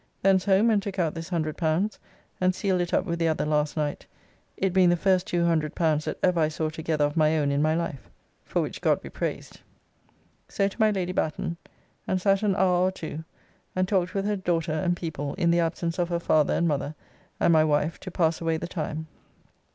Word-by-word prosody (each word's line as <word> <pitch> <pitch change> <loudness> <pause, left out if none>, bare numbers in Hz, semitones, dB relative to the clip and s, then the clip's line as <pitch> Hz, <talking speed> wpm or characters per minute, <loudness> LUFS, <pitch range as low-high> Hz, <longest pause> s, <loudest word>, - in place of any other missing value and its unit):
Thence 190 -1 +4
home, 205 +3 +4
and 210 -2 +3
took 195 -1 -6
out 165 -4 +1
this 165 +1 -7
L100 165 +3 -1 0.4
and 185 0 +2
sealed 190 -3 0
it 175 - -2
up - - +1
with 170 -2 -3
the 165 - +2
other 160 -1 0
last 150 0 0
night, 150 -1 -2 0.5
it 190 -2 0
being 185 -2 +5
the 175 - +4
first 185 0 +2
L200 160 -2 +1
that - - -3
ever 180 -2 +3
I 155 - +3
saw 155 0 -2
together 155 -1 -1
of 145 - -3
my 155 -1 +3
own 145 -2 +1
in 140 +1 +1
my 155 +1 +2
life. 165 -5 -4 0.3
For - - -1
which - - -6
God - - +2
be - - -10
praised. - - -5 0.9
So 195 - +1
to 200 - -8
my 215 -1 +5
Lady 185 -3 -1
Batten, 165 -1 -2 0.5
and 185 - +1
sat 195 +1 +2
an 205 -3 +1
hour 180 -1 +3
or - - 0
two, 160 -3 -7 0.5
and 185 0 +1
talked 185 -1 0
with 195 0 0
her 210 0 +1
daughter 170 -4 -1
and 175 +3 0
people 145 -4 -4
in 170 -3 +2
the 170 - +3
absence 165 +1 -1
of 175 -1 0
her 170 - 0
father 155 -3 +2
and 170 - +1
mother 145 0 -2 0.4
and 170 - +4
my 155 -1 +5
wife 150 +1 0
to 185 - -7
pass 165 -2 0
away 165 -1 0
the 170 - -5
time. 160 -2 -4
170 Hz, 215 wpm, -26 LUFS, 155-185 Hz, 0.9 s, being